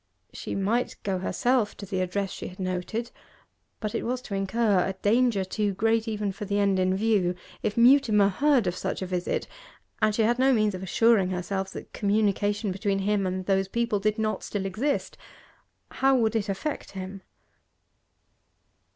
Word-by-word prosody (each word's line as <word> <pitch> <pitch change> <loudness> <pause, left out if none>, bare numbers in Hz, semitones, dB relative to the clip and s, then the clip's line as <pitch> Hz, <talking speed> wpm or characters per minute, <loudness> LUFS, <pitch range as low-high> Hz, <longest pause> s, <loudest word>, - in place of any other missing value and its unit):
She - - -5
might 215 +5 0
go 190 -2 -1
herself 240 +3 0
to 200 - -7
the 190 -1 -2
address 190 +2 -2
she - - -6
had 185 - -12
noted, 185 +6 -3 0.7
but 215 -1 -3
it 230 - -1
was 250 +2 -1
to 205 - -7
incur 195 +1 +1
a 190 - -2
danger 210 +1 +2
too 205 +1 -1
great 225 +2 +1
even 210 -2 -2
for 200 +2 -7
the 200 0 -1
end 200 -2 +2
in 185 0 +2
view. 200 -4 +2 0.3
If 210 - -2
Mutimer 235 -5 +5
heard 265 +3 +2
of 180 -1 -1
such 190 +1 -3
a - - -2
visit 180 -1 -2 0.5
and 215 -1 +3
she 225 - +2
had 240 +3 +2
no 265 +1 +4
means 215 -3 +2
of 185 - -6
assuring 200 0 +3
herself 190 +1 -3
that - - -9
communication 205 0 +1
between 195 +1 -1
him 200 0 0
and 185 0 -3
those 195 0 +1
people 230 0 0
did 215 +2 0
not 215 -1 -1
still 200 -2 -3
exist 240 +10 -2 0.7
how 270 0 +3
would 225 -3 +1
it 210 -2 -1
affect 200 +8 -4
him? 190 0 -7
205 Hz, 175 wpm, -26 LUFS, 190-225 Hz, 0.7 s, Mutimer